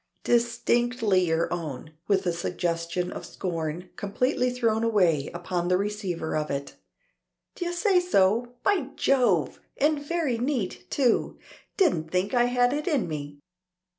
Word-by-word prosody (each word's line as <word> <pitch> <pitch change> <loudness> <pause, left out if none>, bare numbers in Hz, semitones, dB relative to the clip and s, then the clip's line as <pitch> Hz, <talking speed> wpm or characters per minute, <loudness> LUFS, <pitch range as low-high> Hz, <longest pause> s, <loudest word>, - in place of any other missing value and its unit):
"Distinctly 235 -4 +2
your 165 +1 0
own," 155 -3 -5
with 195 -2 +2
a 175 - +1
suggestion 170 +1 -2
of - - -6
scorn, 170 0 -4
completely 250 +6 0
thrown 230 -3 0
away 180 -11 +2
upon 175 0 -3
the 180 0 +3
receiver 195 -5 -3
of 150 0 -1
it. 140 0 -4 0.8
"D'ye 350 -1 -3
say 360 +2 +3
so! 240 - +2
By 380 -9 +2
Jove! 220 - +2 0.2
And 295 +1 +2
very 290 -6 -1
neat 245 -7 -2
too! 250 -5 +1 0.4
Didn't 170 - +2
think 185 +5 0
I 240 -1 +4
had 245 +1 +2
it 300 +3 -3
in 290 - +1
me. 145 -2 -6
205 Hz, 135 wpm, -26 LUFS, 170-250 Hz, 0.8 s, I